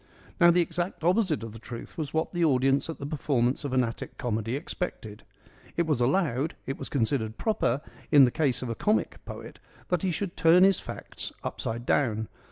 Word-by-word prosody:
Now 170 Hz, -, +8 dB
the 175 Hz, +1 st, +5 dB
exact 175 Hz, +1 st, -3 dB
opposite 180 Hz, -, +2 dB
of 115 Hz, -, -6 dB
the 115 Hz, -, -10 dB
truth 115 Hz, +1 st, -9 dB
was 155 Hz, -4 st, -4 dB
what 160 Hz, +3 st, -1 dB
the 175 Hz, -1 st, +1 dB
audience 135 Hz, -1 st, +3 dB
at 165 Hz, -, -4 dB
the 140 Hz, -, -6 dB
performance 140 Hz, -3 st, 0 dB
of 140 Hz, -, -3 dB
an 130 Hz, -1 st, +3 dB
Attic 115 Hz, -1 st, -5 dB
comedy 115 Hz, 0 st, -1 dB
expected. 135 Hz, -8 st, -5 dB, 0.6 s
It 170 Hz, -, +2 dB
was 150 Hz, -6 st, 0 dB
allowed, 140 Hz, +1 st, +1 dB
it 135 Hz, -, -4 dB
was -, -, -5 dB
considered 110 Hz, -4 st, 0 dB
proper 145 Hz, -, 0 dB, 0.3 s
in 145 Hz, -3 st, +8 dB
the 125 Hz, -, +1 dB
case 135 Hz, -4 st, 0 dB
of 125 Hz, -, -4 dB
a -, -, 0 dB
comic 210 Hz, -, 0 dB
poet, -, -, -9 dB, 0.3 s
that 180 Hz, -3 st, +1 dB
he 190 Hz, -, 0 dB
should 180 Hz, +1 st, -3 dB
turn 165 Hz, +2 st, +6 dB
his 195 Hz, -2 st, +5 dB
facts -, -, -7 dB
upside 115 Hz, +2 st, -4 dB
down. 110 Hz, -6 st, +1 dB
140 Hz, 195 wpm, -28 LUFS, 120-170 Hz, 0.6 s, Now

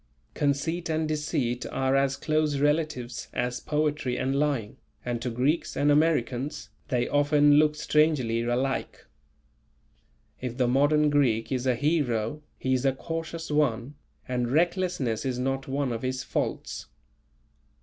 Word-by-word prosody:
Conceit 150 Hz, +5 st, -1 dB
and 160 Hz, 0 st, 0 dB
deceit 150 Hz, -5 st, -1 dB
are 135 Hz, 0 st, +1 dB
as 135 Hz, 0 st, +2 dB
close 155 Hz, -2 st, 0 dB
relatives 145 Hz, -5 st, -1 dB
as 125 Hz, 0 st, -1 dB
poetry 150 Hz, -4 st, -1 dB
and 135 Hz, +1 st, 0 dB
lying, 140 Hz, -7 st, -1 dB, 0.3 s
and 120 Hz, -1 st, -2 dB
to 125 Hz, -, -2 dB
Greeks 130 Hz, +8 st, 0 dB
and 145 Hz, +1 st, +3 dB
Americans 145 Hz, -4 st, +1 dB, 0.2 s
they 125 Hz, -5 st, 0 dB
often 145 Hz, 0 st, +4 dB
look 150 Hz, 0 st, +3 dB
strangely 150 Hz, -7 st, +2 dB
alike. 125 Hz, +3 st, -2 dB, 1.4 s
If 125 Hz, -1 st, -4 dB
the 125 Hz, -2 st, +2 dB
modern 145 Hz, +4 st, +3 dB
Greek 125 Hz, -6 st, +2 dB
is 130 Hz, 0 st, -1 dB
a 125 Hz, -, +3 dB
hero, 145 Hz, -3 st, 0 dB, 0.2 s
he 130 Hz, -, 0 dB
is 130 Hz, 0 st, +1 dB
a 135 Hz, -1 st, +3 dB
cautious 165 Hz, +2 st, -5 dB
one 140 Hz, -3 st, +1 dB, 0.3 s
and 125 Hz, -1 st, -1 dB
recklessness 170 Hz, -, +1 dB
is 130 Hz, -2 st, -2 dB
not 135 Hz, +1 st, -2 dB
one 135 Hz, -1 st, -1 dB
of 115 Hz, -1 st, -3 dB
his 130 Hz, 0 st, -2 dB
faults. -, -, -3 dB
135 Hz, 140 wpm, -27 LUFS, 125-150 Hz, 1.4 s, often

